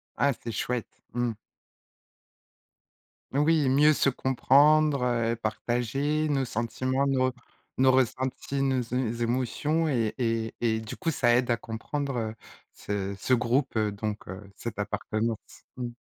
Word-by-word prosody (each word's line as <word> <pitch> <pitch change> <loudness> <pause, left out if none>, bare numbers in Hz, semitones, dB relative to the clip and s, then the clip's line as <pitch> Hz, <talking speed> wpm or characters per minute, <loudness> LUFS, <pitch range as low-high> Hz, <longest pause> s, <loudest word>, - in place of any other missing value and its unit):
Ah, 140 - +3
c'est 115 - -7
chouette, 120 +2 -2 0.3
mmh. 120 -1 0 2.0
Oui, 150 0 +3
mieux 145 +4 +5
se 140 - +2
comprendre, 140 +3 +4
heu, 115 -1 +1
partager 125 +7 -1
nos 135 -2 +1
sentiments, 130 +4 -1
nos 130 -2 +2 0.4
nos 130 0 +5
ressentis, 130 +2 0
nos 135 -2 +2
é 120 -2 -1
émotions 130 +7 0
et 115 -6 0
et 115 -2 -1
et 110 -2 +1
du 110 -1 -7
coup 165 -3 -1
ça 120 -5 +3
aide 125 -1 +2
à 115 - +2
comprendre, 135 +5 -4
heu, 110 -1 -3 0.4
ce 100 -1 -4
ce 130 - +1
groupe, 125 +3 +1
heu, 110 -1 +1
donc 105 +1 -4
heu, 95 +2 -8
cette 110 -1 -6
appartenance, 110 +2 -1 0.4
mmh. 125 -1 -4
125 Hz, 140 wpm, -27 LUFS, 115-135 Hz, 2.0 s, mieux